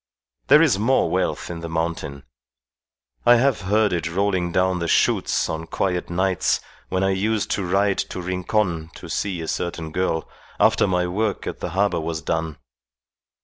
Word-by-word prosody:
There 150 +4 +7
is 130 -12 +3
more 130 +5 +2
wealth - - -1
in 85 - -6
the 85 0 -6
mountain. 80 -4 -3 1.0
I 120 0 +7
have 130 0 +2
heard 105 +1 +2
it 85 -2 -1
rolling 90 -1 0
down 90 0 +1
the 85 - -2
shoots - - +2
on 80 +1 -4
quiet 90 -2 -1
nights 95 +1 +1 0.3
when 95 +1 0
I 95 - +2
used 105 +3 0
to 100 - 0
ride 95 +2 +1
to - - -5
Rincon 90 -2 -1
to - - -10
see 95 -4 -2
a 80 - -5
certain 80 -2 -3
girl, 80 -1 -1 0.3
after - - +4
my 90 -1 +1
work 100 +4 -1
at - - -5
the - - -4
harbour 95 -2 +1
was 80 0 -4
done. 80 -2 -2
90 Hz, 170 wpm, -23 LUFS, 85-100 Hz, 1.0 s, There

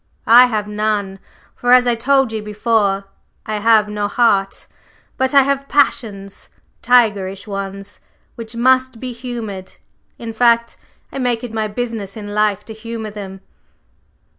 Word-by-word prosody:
I 245 +2 +7
have 215 -3 -2
none; 210 -2 -2 0.4
for 245 0 +2
as 250 0 +6
I 240 - +2
told 265 +1 +2
you 220 -1 -4
before, 210 -2 0 0.4
I 215 -1 -3
have 215 0 +3
no 210 0 -2
heart, 200 -3 +1 0.5
but 260 +1 0
I 275 - +7
have 275 0 -2
passions 205 -9 0 0.3
tigerish 205 -6 +2
ones 195 -1 -7 0.3
which 230 0 -9
must 255 0 +2
be 255 0 -5
humored; 230 -6 -7 0.4
in 230 -1 -7
fact, 235 0 +2 0.4
I - - -6
make 245 -2 -1
it 240 -2 -7
my 220 -1 -1
business 220 -2 -5
in 205 -1 -7
life 210 -2 0
to 220 - -8
humor 220 0 -7
them." 195 -2 -9
220 Hz, 145 wpm, -18 LUFS, 205-245 Hz, 0.5 s, I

